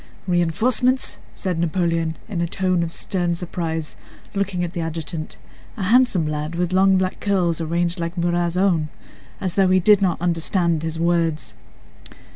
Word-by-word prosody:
"Reinforcements?" 225 +9 +1
said 180 -3 -3
Napoleon 165 -1 0
in 185 -5 -3
a 170 - 0
tone 185 0 0
of 165 -1 -2
stern 175 -1 -1
surprise, 165 -3 -4 0.4
looking 195 -3 -1
at 175 0 -4
the 170 - -3
adjutant—a 160 +4 -7
handsome 220 -4 +4
lad 150 +2 -3
with 175 +1 -1
long 190 0 +5
black 185 0 -1
curls 180 -5 +1
arranged 170 +2 -1
like 170 +1 -4
Murat's 175 0 0
own—as 180 0 -2
though 195 -1 +3
he 185 0 +5
did 205 +2 +5
not 185 -3 +1
understand 170 -1 0
his 160 0 -3
words. 165 -8 0
175 Hz, 145 wpm, -22 LUFS, 165-185 Hz, 0.4 s, long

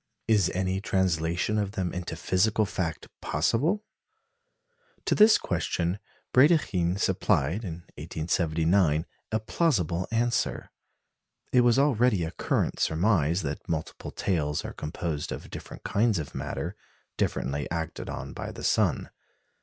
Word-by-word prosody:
Is 105 -5 +4
any 95 +1 0
translation 90 +2 +1
of 100 -1 -2
them 90 -4 -2
into 90 -2 -4
physical 105 +6 +2
fact 90 -5 -3
possible? 140 - +1 1.2
To - - +2
this 215 +1 +7
question 90 +1 -1 0.3
Brédikhine 105 - +4
supplied, 95 -1 +1
in 85 -3 -6 0.2
1879, 80 0 +1 0.3
a 110 - +1
plausible 100 - 0
answer. 120 +1 0 0.8
It 125 - +6
was 120 0 +4
already 125 - +3
a 80 - -3
current - - -1
surmise 85 -1 +2
that 70 -1 -5
multiple 80 -1 -3
tails 75 -6 -1
are - - -5
composed 75 0 -4
of - - -7
different - - -9
kinds 110 0 +2
of 75 -3 -5
matter, - - -4 0.4
differently 70 0 -1
acted 80 -2 -4
on - - -6
by - - -5
the - - -9
sun. - - +1
90 Hz, 125 wpm, -27 LUFS, 80-110 Hz, 1.2 s, this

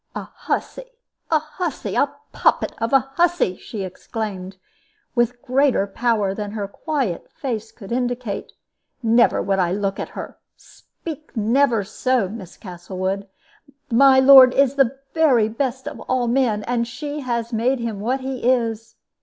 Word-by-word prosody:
"A - - -4
hussy! - - -4 0.4
a 320 - +4
hussy! 310 +2 -4
a - - +2 0.2
poppet - - +2
of 230 - 0
a 270 0 +3
hussy!" 345 - +2
she 205 0 -7
exclaimed, 190 0 -6 0.6
with 240 0 0
greater 265 -4 +2
power 210 -1 0
than 205 0 -5
her 205 -2 -3
quiet 240 - -3
face 225 -5 -4
could 200 -3 -12
indicate; 245 -3 -3 0.5
"never 235 +1 +4
would 195 0 0
I 175 -2 +2
look 195 0 -2
at - - -4
her. - - -7 0.2
Speak 310 -5 -11
never 230 +1 +2
so, 245 +1 0
Miss 190 -3 -9
Castlewood. 185 +1 -4 0.6
My 265 +2 +6
lord 265 -1 +9
is 275 -1 +4
the 270 -2 +2 0.2
very 270 -9 +4
best 260 +3 -3
of - - -6
all 255 -2 +1
men, 235 -4 +1
and 235 0 -1
she 290 +4 -5
has 235 -3 -3
made 245 +4 +1
him 230 -4 -4
what 250 +6 -1
he 260 -1 -4
is. 225 -3 -2
235 Hz, 150 wpm, -21 LUFS, 210-265 Hz, 0.6 s, lord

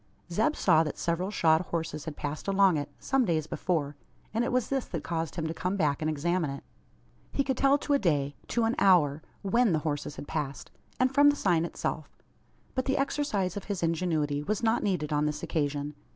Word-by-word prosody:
Zeb 220 - +2
saw 160 -4 +4
that 150 - -4
several 170 +3 -1
shod 160 -5 +3
horses 165 -3 -4
had 160 -2 -5
passed 145 +4 -5
along 195 -2 +4
it, 145 -1 -2
some 270 -1 +1
days 165 -7 0
before: 155 -4 -2 0.4
and 230 +2 +1
it - - -1
was 250 -1 +1
this 270 -2 0
that 165 -4 -5
caused 165 0 -3
him 165 -3 -2
to 160 - -2
come 185 +4 -2
back 150 -5 +1
and 155 - 0
examine 165 +2 0
it. 140 0 -6 0.7
He 275 - +1
could 265 -1 -1
tell 275 +2 +4
to 290 - -1
a 280 - +4
day 145 - 0
to 235 - 0
an 225 +1 +2
hour 160 -7 +4 0.2
when 220 +1 +3
the - - +3
horses 145 -1 -2
had 145 - -8
passed; 145 -4 -4 0.3
and 255 +1 +2
from 290 +1 +7
the 290 - +2
sign 170 - +2
itself. 155 -2 -4 0.6
But 260 - -1
the 270 - +1
exercise 275 - 0
of 205 - -5
his 200 -4 -3
ingenuity 160 -4 0
was 210 +9 -2
not 225 +1 +2
needed 170 -7 -1
on 150 0 +2
this 150 - -4
occasion. 145 -2 -1
170 Hz, 210 wpm, -29 LUFS, 150-215 Hz, 0.7 s, from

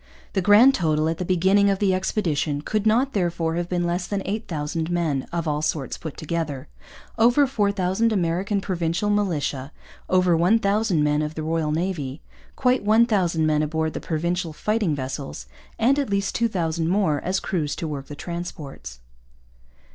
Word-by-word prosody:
The 190 - +1
grand 210 +8 +7
total, 155 -6 +1
at 165 - -3
the 180 - -2
beginning 190 +3 +3
of 195 - +1
the 195 -1 +2
expedition, 160 -7 -1
could 215 +3 0
not, 250 +5 +2
therefore, 170 -4 0
have 175 +1 -2
been 175 -1 0
less 175 +1 -1
than 200 -2 -2
8,000 165 -6 -3
men, 165 -6 -1
of 170 -1 -2
all 150 0 0
sorts 150 -4 -2
put 160 -3 -8
together 155 -4 -3 0.5
over 245 +5 +5
4,000 205 -2 +1
American 195 +1 0
Provincial 175 +2 -1
militia, 155 -9 -1 0.4
over 180 -2 +3
1,000 200 -1 +2
men 150 0 +2
of 155 +1 -3
the 155 - -4
Royal 160 -1 -1
Navy, 155 -4 -3 0.3
quite 250 -2 +2
1,000 205 -7 +3
men 155 -1 +2
aboard 160 0 -1
the - - -4
Provincial 170 +1 -2
fighting 210 -2 0
vessels, 130 - -5 0.3
and 260 +5 +3
at 280 - -1
least 200 -1 0
2,000 170 -8 0
more 180 -7 +1
as 185 +1 -1
crews 155 -6 -2
to 165 - -4
work 140 -3 -5
the 145 - -8
transports. 145 - -7
175 Hz, 160 wpm, -23 LUFS, 155-200 Hz, 0.5 s, grand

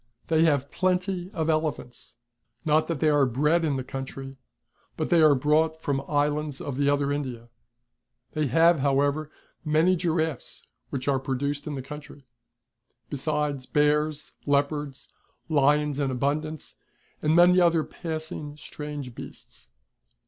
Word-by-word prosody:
They 160 0 +4
have 140 -3 +1
plenty 185 0 0
of 160 -5 -2
elephants, 155 -8 -2 0.5
not 155 0 +3
that 165 -4 -2
they 155 - +4
are 145 -2 +4
bred 150 +7 +2
in 150 -3 +1
the 130 - -2
country, 135 +1 -7 0.6
but - - -2
they 170 -2 +5
are 155 -2 +6
brought 155 +4 +2
from 145 -3 -1
the 135 - -4
Islands 145 -1 0
of 140 - -5
the 140 0 +2
other 145 0 +1
India. 125 -5 -5 0.8
They 155 -1 0
have 165 +5 +4
however 145 +2 +1 0.3
many 160 +4 +3
giraffes, 160 -5 -2 0.2
which 135 -1 -4
are 135 -2 +2
produced 140 +3 -3
in 150 - -3
the 135 - -5
country; 145 0 -10 0.9
besides 145 -2 -1
bears, 150 0 +1 0.2
leopards, 145 -1 -1 0.4
lions 150 -1 +2
in 140 -2 +1
abuntlance. 145 +4 -2 0.4
and 155 +1 +2
many 180 +1 +6
other 170 -2 +4
passing 155 -3 -6
strange 150 -4 -7
beasts. - - -12
150 Hz, 140 wpm, -26 LUFS, 140-155 Hz, 0.9 s, are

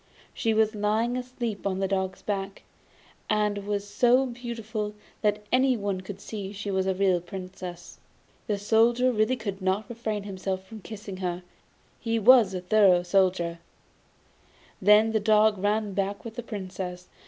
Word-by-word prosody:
She 225 - 0
was 220 0 +3
lying 215 +3 0
asleep 245 -5 -4
on 190 -1 -1
the 195 0 0
dog's 190 -1 -2
back, 195 -1 -4 0.7
and 210 -1 0
was 205 -1 -2
so 245 +5 +3
beautiful 230 -4 -5 0.3
that 210 -1 +1
anyone 230 -7 +2
could 190 +1 -8
see 200 -1 -6
she 205 0 -4
was 190 0 0
a 190 - +1
real 185 -2 +2
Princess. 180 -1 -8 0.5
The 210 -3 0
Soldier 235 +5 +3
really 215 +2 +2
could 205 -5 -5
not 190 +3 0
refrain 220 -3 -4 0.2
from 190 +3 -4
kissing 205 -2 -8
her 180 -1 -3 0.6
he 230 -1 -1
was 230 -1 +7
such 185 -2 -5
a - - -27
thorough 190 -3 +5
Soldier. 175 -2 +1 1.2
Then 210 +3 +6
the 220 - +2
dog 215 -1 +4
ran 205 +1 0
back 200 +2 -2
with 230 - -6
the 240 - -5
Princess. 185 -5 -6
205 Hz, 155 wpm, -27 LUFS, 190-220 Hz, 1.2 s, was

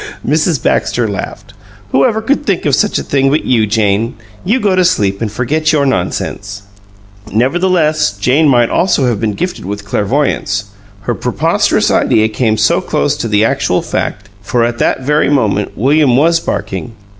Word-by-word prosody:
Mrs. - - +1
Baxter - - 0
laughed. - - -6 0.4
"Who - - +3
ever 220 -3 0
could 280 +6 0
think 195 -10 -1
of 145 - +1
such 210 +10 +1
a - - -3
thing 135 -1 +1
but 150 +3 0
you, 115 -4 +2
Jane! 110 +2 0 0.3
You 230 +7 +1
go 205 -5 +1
to 185 - +3
sleep 100 - 0
and 110 -3 -2
forget 155 +8 0
your 145 -2 +2
nonsense!" 100 -2 -3 0.7
Nevertheless, 155 - +1
Jane 130 +10 +2
might 120 -3 +3
almost 185 +1 +2
have 120 -6 0
been 110 -2 0
gifted 180 +1 -4
with 100 +2 -6
clairvoyance, 105 -1 -1 0.4
her - - -2
preposterous - - 0
idea 110 0 +2
came 110 0 0
so - - +2
close - - -1
to - - -3
the 105 0 +2
actual - - 0
fact, 100 0 -3
for 115 +4 0
at 120 0 -3
that - - 0
very 150 +2 +1
moment 110 -8 0
William 135 +1 +3
was 165 +4 +3
barking. 95 - -4
125 Hz, 170 wpm, -13 LUFS, 105-155 Hz, 0.7 s, Who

